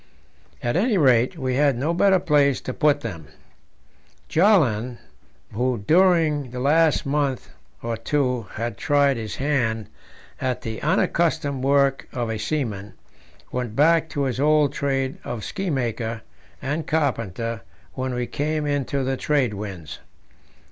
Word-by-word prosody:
At 120 - 0
any 210 +4 +2
rate, 130 0 +3
we 130 -3 -1
had 140 -1 +2
no 150 +7 0
better 190 +2 +4
place 145 -6 +2
to 130 - -5
put 145 0 +2
them. 85 -10 -6 1.0
Bjaaland, 130 - +3 0.6
who 120 -1 -1
during 160 -6 +3
the 125 +1 -6
last 155 +3 +3
month 140 -2 -1 0.3
or 115 0 -2
two 125 -2 -1
had 115 -1 -3
tried 145 -3 +3
his 110 -3 -5
hand 115 -6 -1 0.5
at 130 -1 -2
the 110 -1 -5
unaccustomed 150 -3 +1
work 140 0 +2
of 120 -3 -2
a 110 - -3
seaman, 105 -7 -3 0.6
went 125 -3 -3
back 160 +3 +4
to 145 - -2
his 130 -2 -2
old 150 -1 +3
trade 135 -2 -1
of 120 -3 -5
ski 195 -1 -3
maker 115 -5 -2 0.4
and 150 +4 -2
carpenter 115 - -1 0.3
when 130 -1 -3
we 125 0 -1
came 150 +3 -2
into 140 -1 -1
the 130 0 -1
trade 135 -7 +1
winds. 100 -6 -7
135 Hz, 140 wpm, -23 LUFS, 115-150 Hz, 1.0 s, better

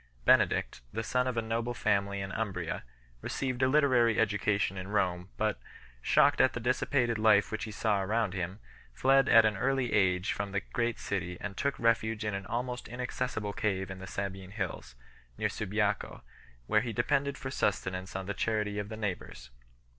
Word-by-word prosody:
Benedict, - - +3
the 110 +2 -3
son 125 +3 +1
of 125 -2 -2
a 115 - +1
noble 115 +2 -2
family 100 -2 0
in 95 0 -5
Umbria, 95 -6 -3 0.4
received 130 -1 -2
a 130 - +5
literary 130 -5 +4
education 105 -2 +1
in 95 0 -5
Rome, 95 -3 0
but, 110 -1 0 0.4
shocked - - +4
at 130 - +4
the - - -3
dissipated 120 -1 +1
life 110 -2 +4
which 110 - -3
he 110 - -7
saw 105 -2 +1
around 105 0 0
him, 90 +1 -3 0.4
fled 135 - +4
at 115 -1 +8
an 110 -1 +2
early 130 +3 0
age 95 -1 +2
from 100 -1 -4
the 100 - 0
great 120 -1 0
city 90 -2 -3
and 100 -2 -5
took 140 +5 -1
refuge 115 -1 +1
in 105 - -1
an 100 0 -4
almost 125 +1 -3
inaccessible 125 -3 -3
cave 95 -4 -1
in 95 - -7
the 95 - -8
Sabine 95 -1 -5
hills, 95 - -5 0.4
near - - 0
Subiaco, 105 -1 -2 0.4
where 110 - +3
he 115 0 -4
depended 140 +5 0
for 130 - -5
sustenance 95 -6 -1
on 95 0 -3
the 100 - -3
charity 105 -1 -1
of 105 0 -4
the 110 - -6
neighbours. 90 - -5
105 Hz, 180 wpm, -30 LUFS, 95-120 Hz, 0.4 s, at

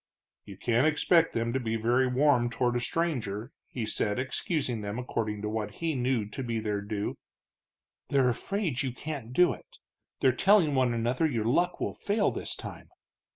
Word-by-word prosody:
"You 100 -2 -10
can't 120 +7 +2
expect 165 +2 +3
them 115 0 -1
to 130 - +1
be 115 -3 -2
very 120 +4 +2
warm 125 -2 +3
toward 120 0 0
a - - +2
stranger," 120 -7 -2 0.2
he 120 -4 -4
said, 105 0 0
excusing 130 -2 -1
them 100 +2 -4
according 110 -4 -3
to - - -1
what 110 -1 -3
he 165 -1 -1
knew 125 -5 0
to 120 - -6
be 120 -3 -2
their 105 -2 -2
due. 105 0 -4 0.9
"They're 135 -3 +3
afraid 165 - -1
you 130 -3 -2
can't 140 -4 -6
do 175 +7 +4
it, - - -15 0.4
they're 130 - +4
telling 180 - +4
one 130 -3 +2
another 120 +7 +1
your 115 -7 -1
luck 175 +9 +1
will - - -2
fail 205 +1 +1
this - - -4
time. - - -9
125 Hz, 180 wpm, -29 LUFS, 115-145 Hz, 0.9 s, do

